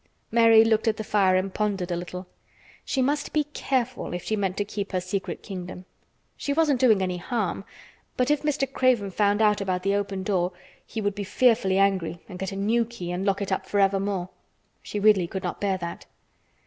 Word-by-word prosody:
Mary 230 -1 +7
looked 225 0 +2
at 220 - +2
the 220 - -3
fire 195 -3 +3
and 185 +1 0
pondered 200 -4 -1
a - - 0
little. 180 +2 -6 0.6
She 265 - 0
must 290 +2 -1
be 305 - +3
careful 255 -7 -2
if 175 - -5
she 220 - -1
meant 195 -2 -1
to 205 - 0
keep 200 -1 -5
her 185 - +2
secret 185 +2 -4
kingdom. 180 -1 -7 0.5
She 285 - -2
wasn't 295 -4 +2
doing 220 -7 +4
any 180 -1 -2
harm, 195 -1 -2 0.5
but 250 +3 +2
if 295 - +2
Mr. 295 -2 0
Craven 245 -8 +2
found 205 +2 +2
out 210 -1 +3
about 185 -2 -1
the 195 +1 +1
open 200 -1 -2
door 185 -2 0 0.3
he 220 - -4
would 205 -1 0
be 205 0 -4
fearfully 200 -3 +2
angry 190 -4 +1
and 185 -3 -9
get 190 0 -3
a - - -6
new 220 +4 +2
key 220 -7 -7
and 180 +2 -2
lock 200 0 +1
it 195 - -5
up 190 - -1
forevermore. 195 -2 +1 0.5
She 210 - -4
really 200 -4 +4
could 190 +2 -5
not 180 - -4
bear 195 -2 +1
that. 170 -1 -7
200 Hz, 205 wpm, -25 LUFS, 185-225 Hz, 0.6 s, Mary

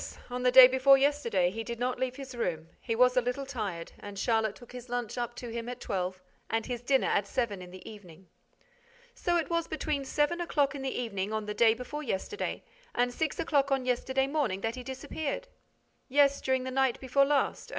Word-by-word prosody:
On 250 0 -3
the 250 - +4
day 255 0 +11
before 260 +1 +5
yesterday, 265 -11 +2
he 225 +3 -4
did 235 +1 -5
not 250 +1 -1
leave 255 -1 -1
his 270 -1 -8
room. 165 -9 -3
He 230 - -2
was 250 +2 +4
a 250 - +4
little 250 +3 -2
tired; 205 -11 -4
and 205 -1 -9
Charlotte 220 0 +1
took 245 - -14
his 250 0 -9
lunch 245 -2 -3
up 240 -1 -3
to 240 - -7
him 230 +1 -5
at 250 0 -6
twelve 185 -3 -3 0.3
and 225 0 0
his 245 -2 -4
dinner 265 +2 +2
at 200 - +1
seven 210 -5 -2
in 180 - -10
the 185 +1 -12
evening." 190 -5 -12 0.9
"So 345 -1 0
it 335 0 -2
was 335 -1 0
between 305 -2 -2
seven 295 +5 0
o'clock 295 -5 +1
in 280 - -6
the 265 - -2
evening, 205 -4 -3
on 215 -1 -2
the 210 - -3
day 225 0 +4
before 250 +5 -6
yesterday, 270 - -3 0.3
and 245 0 +1
six 315 +3 -2
o'clock 285 -4 +1
on 265 -2 +1
yesterday 260 +2 +1
morning 270 -10 -1
that 225 +2 -1
he 255 - -7
disappeared?" 305 - -4 0.6
"Yes, 280 +1 +4
during 260 -1 +1
the 260 - -4
night 265 -2 +1
before 275 +1 +3
last. 285 0 0
250 Hz, 210 wpm, -30 LUFS, 225-275 Hz, 0.9 s, day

